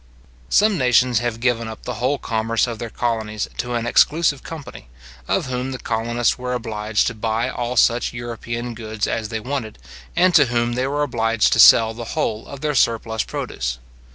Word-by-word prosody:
Some 210 Hz, -4 st, +3 dB
nations 125 Hz, -2 st, +3 dB
have 120 Hz, -2 st, -3 dB
given 120 Hz, -2 st, 0 dB
up 110 Hz, -, -9 dB
the 125 Hz, -, -4 dB
whole 135 Hz, +3 st, +1 dB
commerce 115 Hz, -1 st, 0 dB
of 115 Hz, -3 st, -6 dB
their 115 Hz, -, -5 dB
colonies 110 Hz, -2 st, -2 dB
to 120 Hz, 0 st, -3 dB
an 115 Hz, -1 st, -1 dB
exclusive 150 Hz, +3 st, +3 dB
company, 145 Hz, -, -9 dB, 0.4 s
of -, -, 0 dB
whom 130 Hz, +1 st, -3 dB
the 130 Hz, -, -4 dB
colonists 120 Hz, +1 st, -1 dB
were 125 Hz, 0 st, -2 dB
obliged 110 Hz, -3 st, -1 dB
to 120 Hz, -, -1 dB
buy 110 Hz, +1 st, -1 dB
all 120 Hz, +1 st, -3 dB
such 120 Hz, +1 st, +3 dB
European 120 Hz, 0 st, -5 dB
goods 110 Hz, -1 st, -4 dB
as 110 Hz, -1 st, -2 dB
they 110 Hz, -1 st, -3 dB
wanted, 125 Hz, -2 st, -4 dB, 0.4 s
and 180 Hz, +1 st, +4 dB
to 150 Hz, -4 st, +7 dB
whom 120 Hz, -1 st, 0 dB
they 125 Hz, +2 st, -1 dB
were 145 Hz, +1 st, 0 dB
obliged 115 Hz, -4 st, +1 dB
to -, -, +1 dB
sell 115 Hz, -1 st, +8 dB
the 115 Hz, 0 st, -7 dB
whole 110 Hz, 0 st, -1 dB
of 140 Hz, -1 st, -9 dB
their 150 Hz, -1 st, 0 dB
surplus 115 Hz, -3 st, +1 dB
produce. -, -, -4 dB
120 Hz, 185 wpm, -21 LUFS, 110-125 Hz, 0.4 s, sell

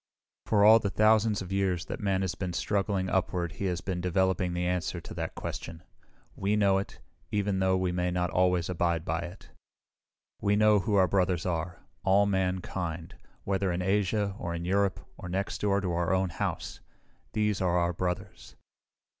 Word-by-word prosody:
For 105 Hz, -2 st, +4 dB
all 110 Hz, +1 st, +8 dB
the 100 Hz, -, -1 dB
thousands 110 Hz, 0 st, +3 dB
of 90 Hz, -, -10 dB
years 95 Hz, -3 st, 0 dB
that -, -, -5 dB
man 95 Hz, -2 st, 0 dB
has 95 Hz, -2 st, -1 dB
been 90 Hz, -1 st, -4 dB
struggling 100 Hz, 0 st, 0 dB
upward 90 Hz, -2 st, -1 dB
he 100 Hz, -, -5 dB
has 90 Hz, -2 st, -1 dB
been 90 Hz, -3 st, -3 dB
developing 90 Hz, 0 st, +1 dB
the 90 Hz, 0 st, -1 dB
answer 90 Hz, -1 st, -1 dB
to -, -, -10 dB
that -, -, -4 dB
question. 85 Hz, 0 st, -6 dB, 0.5 s
We 100 Hz, +2 st, 0 dB
know 100 Hz, -2 st, +3 dB
it, 100 Hz, -, -7 dB, 0.3 s
even 100 Hz, -2 st, 0 dB
though 95 Hz, 0 st, +2 dB
we 95 Hz, -1 st, 0 dB
may 90 Hz, 0 st, 0 dB
not 90 Hz, -1 st, -1 dB
always 90 Hz, -2 st, +2 dB
abide 85 Hz, -2 st, 0 dB
by 80 Hz, +1 st, -1 dB
it. 85 Hz, +1 st, -9 dB, 0.9 s
"We 100 Hz, 0 st, +2 dB
know 105 Hz, 0 st, +5 dB
who 105 Hz, +2 st, 0 dB
our 95 Hz, -2 st, +5 dB
brothers 90 Hz, -3 st, +1 dB
are 85 Hz, -1 st, -3 dB, 0.2 s
all 100 Hz, +1 st, +4 dB
mankind, 90 Hz, -3 st, -2 dB, 0.3 s
whether 95 Hz, -1 st, 0 dB
in 90 Hz, +1 st, -2 dB
Asia 100 Hz, +1 st, +1 dB
or 85 Hz, 0 st, -3 dB
in 85 Hz, 0 st, -4 dB
Europe 100 Hz, 0 st, +1 dB, 0.2 s
or 90 Hz, -, -8 dB
next 95 Hz, +2 st, -3 dB
door 100 Hz, -1 st, +2 dB
to 90 Hz, -3 st, -2 dB
our 85 Hz, +2 st, +1 dB
own 95 Hz, 0 st, +1 dB
home. -, -, -2 dB, 0.8 s
These 105 Hz, -2 st, 0 dB
are 90 Hz, -1 st, +2 dB
our 85 Hz, 0 st, +1 dB
brothers." 90 Hz, 0 st, -4 dB
95 Hz, 180 wpm, -29 LUFS, 90-100 Hz, 0.9 s, all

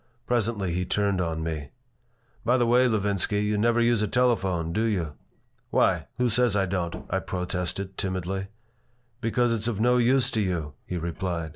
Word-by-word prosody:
Presently 110 Hz, -6 st, 0 dB
he 90 Hz, +1 st, 0 dB
turned 100 Hz, 0 st, 0 dB
on 80 Hz, -2 st, -2 dB
me 80 Hz, -3 st, -4 dB, 0.7 s
"By 125 Hz, +2 st, +3 dB
the 120 Hz, -, +3 dB
way, 125 Hz, +2 st, +4 dB
Levinsky, 105 Hz, -2 st, +1 dB
you 105 Hz, 0 st, 0 dB
never 115 Hz, +3 st, +2 dB
use 120 Hz, -2 st, +3 dB
a 105 Hz, -, +1 dB
telephone, 95 Hz, -9 st, +1 dB
do 110 Hz, +5 st, +1 dB
you?" 90 Hz, -9 st, -1 dB, 0.6 s
"Why? -, -, +2 dB
Who 125 Hz, -, +2 dB
says 120 Hz, -1 st, +2 dB
I 100 Hz, -1 st, +2 dB
don't?" 90 Hz, -2 st, -3 dB
I 95 Hz, -, +1 dB
protested, 90 Hz, +1 st, -3 dB
timidly 95 Hz, 0 st, -2 dB, 0.7 s
"Because 120 Hz, +1 st, +1 dB
it's 110 Hz, 0 st, -2 dB
of 110 Hz, -4 st, -1 dB
no 125 Hz, +2 st, +4 dB
use 125 Hz, +2 st, +3 dB
to 110 Hz, -, 0 dB
you," 85 Hz, -7 st, -2 dB
he 90 Hz, -, -3 dB
replied. 85 Hz, -1 st, -3 dB
100 Hz, 170 wpm, -26 LUFS, 90-115 Hz, 0.7 s, way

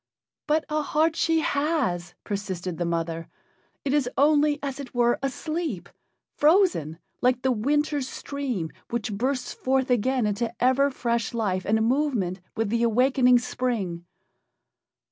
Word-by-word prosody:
"But 305 Hz, +1 st, +2 dB
a 305 Hz, 0 st, 0 dB
heart 315 Hz, +2 st, +1 dB
she 325 Hz, -1 st, +2 dB
has," 280 Hz, -, -1 dB
persisted 185 Hz, -4 st, -4 dB
the 175 Hz, -, 0 dB
mother. 165 Hz, -1 st, -2 dB, 0.6 s
"It 275 Hz, -, +1 dB
is 285 Hz, -4 st, +2 dB
only, 295 Hz, +1 st, +4 dB
as 275 Hz, -1 st, -4 dB
it 260 Hz, -3 st, -8 dB
were, 240 Hz, 0 st, +3 dB
asleep 310 Hz, +5 st, -3 dB, 0.5 s
frozen, 300 Hz, -, +3 dB, 0.2 s
like 250 Hz, 0 st, +2 dB
the 260 Hz, -, +3 dB
winter 290 Hz, +5 st, +1 dB
stream 255 Hz, -, -4 dB, 0.2 s
which 225 Hz, -3 st, -2 dB
bursts 255 Hz, +5 st, -1 dB
forth 265 Hz, 0 st, 0 dB
again 250 Hz, +1 st, +2 dB
into 210 Hz, +2 st, -1 dB
ever 260 Hz, +3 st, +3 dB
fresh 235 Hz, -3 st, -2 dB
life 190 Hz, -5 st, -1 dB
and 220 Hz, +2 st, +2 dB
movement 240 Hz, -9 st, 0 dB, 0.2 s
with 225 Hz, -2 st, 0 dB
the 230 Hz, +2 st, 0 dB
awaking 250 Hz, +2 st, +4 dB
spring." 230 Hz, -8 st, -2 dB
250 Hz, 135 wpm, -25 LUFS, 210-285 Hz, 0.6 s, only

